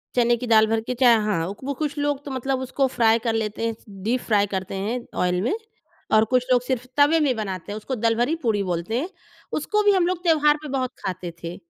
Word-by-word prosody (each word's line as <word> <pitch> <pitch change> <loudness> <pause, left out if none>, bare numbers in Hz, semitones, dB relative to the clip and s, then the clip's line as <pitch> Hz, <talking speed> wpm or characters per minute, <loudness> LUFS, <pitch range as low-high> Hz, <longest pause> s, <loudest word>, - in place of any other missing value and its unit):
चने 240 -1 +4
की 245 - -5
दाल 220 -1 +5
भर 225 0 +1
के 250 - -4
चाहे 240 -2 +6
हाँ। 190 -6 0 0.2
वो 280 +1 -2
कुछ 295 -1 -2
लोग 290 -1 -1
तो 280 - -6
मतलब 265 0 -1
उसको 265 +1 0
फ्राई 230 -2 +3
कर 225 0 -1
लेते 220 0 -2
हैं, 225 - -3 0.3
डीप 240 +3 0
फ्राई 205 -2 +2
करते 190 0 -4
हैं 215 +6 -2 0.2
ऑयल 180 0 +1
में 240 - 0 0.6
और 215 0 +6
कुछ 250 +2 +1
लोग 245 -1 +5
सिर्फ़ 250 -1 -2
तवे 295 +3 +5
में 275 -5 +2
बनाते 195 -3 -5
हैं 210 - -4
उसको 255 +5 -4
दलभरी 235 +6 +1
पूड़ी 210 -4 +1
बोलते 180 +6 -2
हैं। 340 +6 -3 0.5
उसको 420 +7 0
भी 410 - +5
हम 365 -3 +3
लोग 365 0 -2
त्योहार 300 -3 +4
पे - - -6
बहुत 255 -1 -2
खाते 180 -2 -4
थे। 170 +1 -5
240 Hz, 230 wpm, -23 LUFS, 215-275 Hz, 0.6 s, चाहे